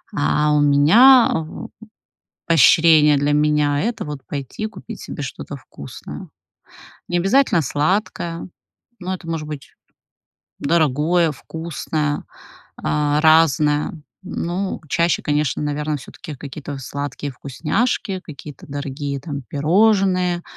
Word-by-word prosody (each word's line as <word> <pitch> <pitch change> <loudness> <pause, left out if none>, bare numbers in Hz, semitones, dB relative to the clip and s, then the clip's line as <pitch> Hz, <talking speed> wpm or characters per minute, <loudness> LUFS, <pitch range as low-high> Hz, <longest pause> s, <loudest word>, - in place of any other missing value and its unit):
А 150 - +2
у 150 - +3
меня 215 - +6
в 160 -1 -5 0.8
поощрение 160 -2 +6
для 145 +1 +1
меня- 150 -1 +2
это 235 +2 -2
вот 150 -2 -6
пойти 145 - -5
купить - - -10
себе - - -7
что-то - - -7
вкусное. - - -10 0.8
Не 175 - +1
обязательно 195 -1 +3
сладкое, 165 - -1 0.5
но 185 +1 -4
это 180 -2 -13
может 165 -2 -3
быть 145 -2 -8 0.9
дорогое, 160 +2 +2
вкусное, 155 -1 -4 0.5
а, 150 0 0
разное, 155 -1 +3 0.2
ну, 185 +1 -3
чаще, 170 +3 +1
конечно, 150 -2 0
наверно, 150 +1 -2
всё-таки 150 +3 -10
какие-то 140 +1 -7
сладкие 145 +2 -5
вкусняшки, 190 - -2
какие-то 150 -1 -11
дорогие, 140 0 -4
там, 140 -1 -6
пирожные, 180 - +2
150 Hz, 110 wpm, -20 LUFS, 145-175 Hz, 0.9 s, меня